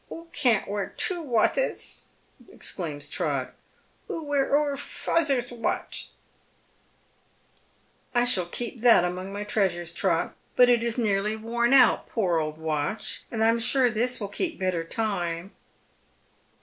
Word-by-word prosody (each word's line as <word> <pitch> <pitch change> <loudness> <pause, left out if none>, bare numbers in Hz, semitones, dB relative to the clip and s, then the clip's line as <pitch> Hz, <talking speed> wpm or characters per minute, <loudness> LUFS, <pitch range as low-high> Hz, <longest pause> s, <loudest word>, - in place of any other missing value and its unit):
" - - -34
Oo 330 - -8
can't 240 -8 +2
wear 205 -1 -4
two 355 -2 0
wathes," 285 - 0 0.5
exclaims 150 -6 -5
Trot. - - -2 0.3
" - - -37
Oo 325 - -4
wear 290 -2 +1
oor 290 0 +2
fazer's 275 -3 -1
wath." 235 -1 -3 1.0
" - - -37
I 240 0 +4
shall 190 -8 +2
keep 235 +5 -5
that 235 -7 +6
among 185 +2 -4
my 205 +1 -4
treasures, 180 -5 -1
Trot; 165 -1 0 0.2
but 250 0 +6
it 235 -1 +3
is 235 0 -2
nearly 210 -2 +1
worn 235 +2 0
out, 260 -3 +5
poor 180 -7 +1
old 155 0 -3
watch, 160 +5 -3
and 220 -1 -1
I 225 - +5
am 230 +1 +2
sure 250 +1 +3
this 245 +3 -1
will 205 -3 -4
keejJ 330 - -3
better 185 -3 -1
time." 175 -2 -2
225 Hz, 150 wpm, -26 LUFS, 185-250 Hz, 1.0 s, that